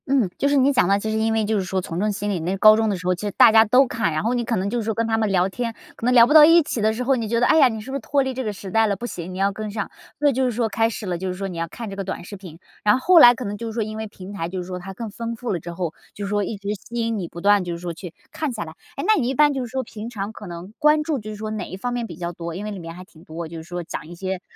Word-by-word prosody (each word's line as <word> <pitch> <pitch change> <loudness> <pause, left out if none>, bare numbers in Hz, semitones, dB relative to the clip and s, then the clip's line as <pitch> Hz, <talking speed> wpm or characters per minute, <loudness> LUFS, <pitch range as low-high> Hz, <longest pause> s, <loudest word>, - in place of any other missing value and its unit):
嗯， 260 -8 +2
就 280 - +2
是 285 - +2
你 275 +1 +4
讲 210 - +3
的， 200 +1 +3
其 220 +1 -3
实 220 - 0
因 220 0 +1
为 220 -1 +1
就 215 0 +1
是 - - -1
说 190 +1 -2
从 175 -2 -5
众 210 +2 +1
心 205 +1 -3
理， 185 - -1
那 180 +4 -2
高 215 +2 +8
中 220 0 +1
的 200 - -1
时 180 - -10
候 185 - +3
其 180 - -7
实 - - -2
大 - - +8
家 220 0 +7
都 250 +5 +5
看， 230 -7 -1
然 155 +3 -1
后 230 +3 +1
你 240 -1 0
可 230 0 -1
能 190 0 -1
就 240 +4 -1
是 - - -2
说 220 0 -2
跟 230 - 0
他 225 0 0
们 215 -2 0
聊 185 -1 +3
天， 230 +3 -4 0.2
可 - - -6
能 250 - +3
聊 235 -2 +8
不 280 - +1
到 310 -1 +10
一 330 +2 +7
起 255 -6 -3
的 215 +1 +3
时 230 +3 -3
候， 270 +2 +3
你 230 -3 -3
觉 230 +2 +1
得， 245 - +3
唉 - - +4
呀， 285 -4 +7
你 220 -3 -4
是 265 - -9
不 - - -3
是 275 - -3
脱 280 -1 +1
离 265 0 -3
这 260 +1 -4
个 215 - -2
时 195 -1 -9
代 225 +2 +3
了？ 200 - 0
不 235 - -7
行， 180 -6 -6
你 185 - -7
要 195 +1 +2
跟 215 +1 -5
上， 205 -1 -4 0.3
所 295 - +3
以 285 - +3
就 260 +2 0
是 250 - +1
说 230 0 0
开 225 +3 +1
始 220 -1 -6
了， 175 -2 -2
就 190 - -3
是 180 - -3
说 195 +1 -4
你 180 - -7
要 165 0 -2
看 230 +6 -8
这 195 - -6
个 195 - -4
短 190 -2 -5
视 200 - -9
频。 180 -5 -11 0.3
然 210 +3 +4
后 - - -4
后 360 -2 +7
来 245 -5 +9
可 250 - -6
能 205 0 -3
就 230 - -5
是 225 - -5
说 225 0 -1
因 215 +1 -6
为 220 0 -4
平 195 -1 -10
台 165 -4 -4
就 185 +1 -4
是 - - -11
说 180 -1 -5
它 195 +2 -8
更 215 +3 -7
丰 230 +2 -5
富 240 +1 -4
了 175 - -2
之 170 +2 -8
后， 170 -2 -3 0.2
就 205 - -5
是 - - -4
说 205 0 +1
一 205 +2 -4
直 200 0 -6
吸 235 +4 -10
引 230 -2 -1
你 175 - -4
不 170 - -10
断 200 +1 +4
就 175 -1 -4
是 - - -5
说 175 -1 -5
去， 170 +1 -9 0.2
看 310 -3 -3
下 220 -3 -4
来。 - - -10 0.2
哎， - - -4
那 435 - +6
你 240 - 0
一 265 - -1
般 295 0 +5
就 270 - -2
是 - - -5
说 260 0 -2
平 225 -1 -8
常 205 -3 -5
可 210 - -10
能， 175 +3 -9
关 300 0 +4
注 300 -3 -1
就 215 -1 -8
是 215 - -6
说 215 +1 -5
哪 210 -4 -4
一 185 - -8
方 245 +5 -3
面 240 -1 -2
比 170 - -9
较 170 +1 -4
多？ 170 -1 -6
因 200 +3 -5
为 210 - -4
里 200 - -6
面 165 -1 -8
还 180 - -9
挺 175 -4 -19
多， 165 -1 -7
就 165 +1 -9
是 160 - -7
说 175 +1 -5
讲 160 - -7
一 175 - -10
些 185 +1 -4
210 Hz, 415 characters per minute, -22 LUFS, 185-235 Hz, 0.3 s, 到